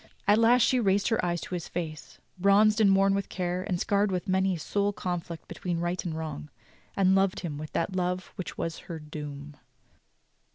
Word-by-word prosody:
At 205 Hz, +2 st, +5 dB
last 235 Hz, +1 st, +5 dB
she 255 Hz, -, +3 dB
raised 200 Hz, -2 st, +2 dB
her 225 Hz, -, +1 dB
eyes 175 Hz, -1 st, -1 dB
to -, -, -7 dB
his 175 Hz, -2 st, -3 dB
face, 160 Hz, -3 st, -6 dB, 0.2 s
bronzed 210 Hz, +3 st, +5 dB
and 195 Hz, -2 st, +6 dB
worn 195 Hz, 0 st, +4 dB
with 200 Hz, -1 st, -2 dB
care, 180 Hz, -1 st, -2 dB
and 185 Hz, -2 st, -2 dB
scarred 200 Hz, +1 st, +1 dB
with 180 Hz, +2 st, -2 dB
many 190 Hz, 0 st, +2 dB
a -, -, -6 dB
soul 200 Hz, +5 st, 0 dB
conflict 175 Hz, -4 st, -5 dB
between 175 Hz, -3 st, -3 dB
right 175 Hz, +1 st, -2 dB
and 160 Hz, -3 st, -4 dB
wrong, 155 Hz, -, -5 dB, 0.5 s
"and 190 Hz, -1 st, +4 dB
loved 195 Hz, -1 st, +2 dB
him 155 Hz, -5 st, -5 dB
with 155 Hz, 0 st, -7 dB
that 185 Hz, +3 st, -1 dB
love 180 Hz, 0 st, -2 dB
which 185 Hz, -, -6 dB
was 165 Hz, 0 st, -3 dB
her 165 Hz, -, -4 dB
doom." 150 Hz, -1 st, -8 dB
185 Hz, 200 wpm, -28 LUFS, 165-200 Hz, 0.5 s, and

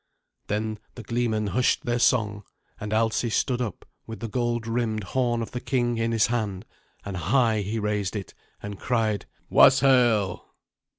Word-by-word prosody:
Then 110 Hz, +1 st, -2 dB, 0.2 s
the 120 Hz, -, -8 dB
gleemen 115 Hz, -1 st, -1 dB
hushed 125 Hz, +5 st, +1 dB
their 120 Hz, 0 st, 0 dB
song, 105 Hz, -4 st, +2 dB, 0.4 s
and 105 Hz, -, -5 dB
Alsi 110 Hz, +2 st, +1 dB
stood 125 Hz, +2 st, 0 dB
up 110 Hz, -7 st, -5 dB, 0.2 s
with 115 Hz, -1 st, -7 dB
the 115 Hz, -, -4 dB
gold 120 Hz, +1 st, -1 dB
rimmed 115 Hz, -2 st, -1 dB
horn 120 Hz, +3 st, 0 dB
of -, -, -8 dB
the 125 Hz, -, -5 dB
king 120 Hz, -3 st, 0 dB
in 115 Hz, 0 st, 0 dB
his 115 Hz, -2 st, +3 dB
hand, 105 Hz, -4 st, -2 dB, 0.4 s
and 100 Hz, -1 st, -5 dB
high 110 Hz, -, +2 dB
he 105 Hz, +3 st, -3 dB
raised 105 Hz, -2 st, -1 dB
it, 100 Hz, -2 st, -6 dB, 0.3 s
and 100 Hz, -1 st, -6 dB
cried, 110 Hz, -4 st, 0 dB, 0.2 s
"Waeshael!" 125 Hz, -7 st, +5 dB
115 Hz, 160 wpm, -25 LUFS, 105-120 Hz, 0.4 s, Waeshael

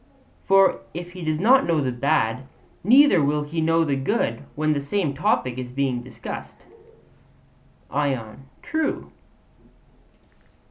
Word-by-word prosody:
For 195 Hz, 0 st, +4 dB, 0.2 s
if 175 Hz, +1 st, -6 dB
he 180 Hz, -1 st, -9 dB
does 155 Hz, -1 st, -1 dB
not 260 Hz, +8 st, +4 dB
know 165 Hz, -2 st, +2 dB
the 130 Hz, -3 st, -1 dB
bad, 130 Hz, -1 st, 0 dB, 0.4 s
neither 245 Hz, -, +6 dB
will 150 Hz, +1 st, 0 dB
he 160 Hz, +3 st, -3 dB
know 165 Hz, +1 st, +3 dB
the 145 Hz, -3 st, 0 dB
good 135 Hz, -, -1 dB
when 155 Hz, +1 st, +1 dB
the 140 Hz, -, -2 dB
same 150 Hz, +1 st, -1 dB
topic 140 Hz, -, 0 dB
is 125 Hz, -1 st, -5 dB
being 130 Hz, -1 st, -1 dB
discussed. 125 Hz, +1 st, -9 dB, 1.3 s
ION: 135 Hz, -3 st, -3 dB, 0.2 s
True. 315 Hz, 0 st, -2 dB
150 Hz, 130 wpm, -23 LUFS, 135-180 Hz, 1.3 s, neither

